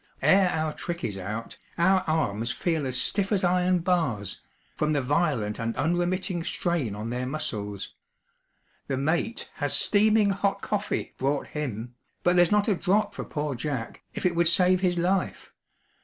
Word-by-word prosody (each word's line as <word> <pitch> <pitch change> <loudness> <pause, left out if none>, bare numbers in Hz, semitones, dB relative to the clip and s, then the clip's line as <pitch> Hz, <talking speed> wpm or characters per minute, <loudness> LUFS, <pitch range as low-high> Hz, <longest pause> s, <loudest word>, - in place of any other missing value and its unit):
Ere 190 -1 +5
our 155 -2 -1
trick 175 0 -5
is 105 - -2
out, 105 +4 -6 0.2
our 190 +3 +4
arms 120 -8 0
feel 160 -3 -1
as 125 -1 0
stiff 200 0 0
as 200 -2 +1
iron 180 +1 +3
bars, 160 - -1 0.3
from 155 0 0
the 145 - +1
violent 130 -7 0
and 115 0 -2
unremitting 175 +2 0
strain 165 - -1
on 110 +3 -5
their 125 +1 -2
muscles. 105 -9 -3 0.9
The 135 - -1
mate 170 - -1
has - - +1
steaming 215 0 +4
hot 200 0 -1
coffee 210 0 -2
brought 140 +1 -1
him; 125 -5 -4 0.3
but 175 0 +3
there's 175 -1 +5
not 210 -1 +3
a 210 - +4
drop 205 +3 +1
for - - -5
poor 150 -1 -3
Jack, 125 -2 -4
if - - -4
it 175 -2 +2
would 170 0 +3
save 180 +2 +4
his 180 -2 +1
life. 180 +2 -1
165 Hz, 165 wpm, -26 LUFS, 125-185 Hz, 0.9 s, Ere